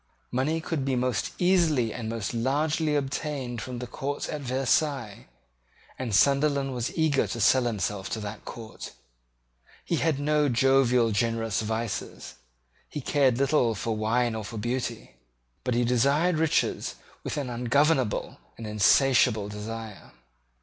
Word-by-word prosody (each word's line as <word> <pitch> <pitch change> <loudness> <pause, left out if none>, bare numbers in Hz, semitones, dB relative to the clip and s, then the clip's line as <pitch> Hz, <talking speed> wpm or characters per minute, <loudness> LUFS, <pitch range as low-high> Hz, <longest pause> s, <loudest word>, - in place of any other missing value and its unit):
Money 145 +6 0
could 160 -3 -3
be 135 -1 0
most 125 -4 -1
easily 165 - +2
and 115 -2 -5
most 115 0 -3
largely 150 +6 0
obtained 135 -3 -3
from 125 -1 -6
the 125 - -5
court 140 +3 -4
of 150 - -4
Versailles; 130 -3 -1 0.7
and 120 -6 -1
Sunderland 140 +1 +3
was 125 +4 -3
eager 155 -4 +2
to 115 - -5
sell 125 +4 +4
himself 105 -3 -2
to 110 - -3
that 105 0 -7
court. 115 -2 -9 0.9
He 170 - 0
had 155 -4 +1
no 150 0 +2
jovial 125 -2 +3
generous 115 0 0
vices. 110 0 -4 0.6
He - - -5
cared 135 -3 +2
little 135 -4 +2
for 110 +3 -2
wine 115 +2 +1
or 110 -1 -4
for 110 +2 -7
beauty: 120 - -4 0.5
but 125 - -1
he 120 0 +2
desired 140 +8 +2
riches 160 -1 0 0.3
with - - -4
an 135 -4 -3
ungovernable 130 +1 +1 0.2
and 115 - -7
insatiable 105 0 +3
desire. 105 - -7
125 Hz, 140 wpm, -27 LUFS, 115-140 Hz, 0.9 s, sell